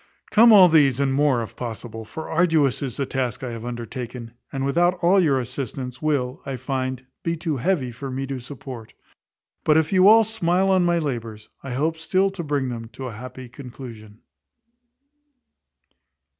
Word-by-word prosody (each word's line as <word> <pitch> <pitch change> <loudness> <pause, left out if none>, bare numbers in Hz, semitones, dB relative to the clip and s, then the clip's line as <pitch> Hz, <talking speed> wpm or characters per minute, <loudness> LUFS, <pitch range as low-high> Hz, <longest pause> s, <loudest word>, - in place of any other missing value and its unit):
Come 230 +2 +7
all 195 -4 +9
these, 145 -6 +4
and 140 -1 +1
more, 135 -4 +2
if 110 - -10
possible; 115 -1 -6
for 160 +8 -7
arduous 160 -6 +2
is 135 -4 -4
the 140 - -1
task 125 -1 -3
I 125 - -4
have 115 -1 -7
undertaken; 120 0 -6 0.2
and, 135 0 -2
without 175 +6 +2
all 185 +3 +5
your 145 -7 +3
assistance, 125 0 -5
will, 135 -5 -1
I 135 -1 -4
find, 130 0 -3 0.2
be 165 0 -2
too 160 -3 -2
heavy 135 -3 0
for 135 +4 -7
me 135 +1 -3
to 135 -1 -4
support. 125 -3 -9 0.7
But 155 0 +4
if 160 +3 +1
you 185 0 +6
all 225 +2 +8
smile 195 -3 +1
on 185 -1 +4
my 175 0 +2
labours 115 -8 -4
I 135 - -6
hope 155 +5 0
still 190 +4 +1
to 190 -3 -6
bring 145 -4 -1
them 115 -2 -6
to 135 - -7
a 125 - -5
happy 130 +3 -9
conclusion. 120 -4 -11
135 Hz, 175 wpm, -23 LUFS, 125-165 Hz, 0.7 s, all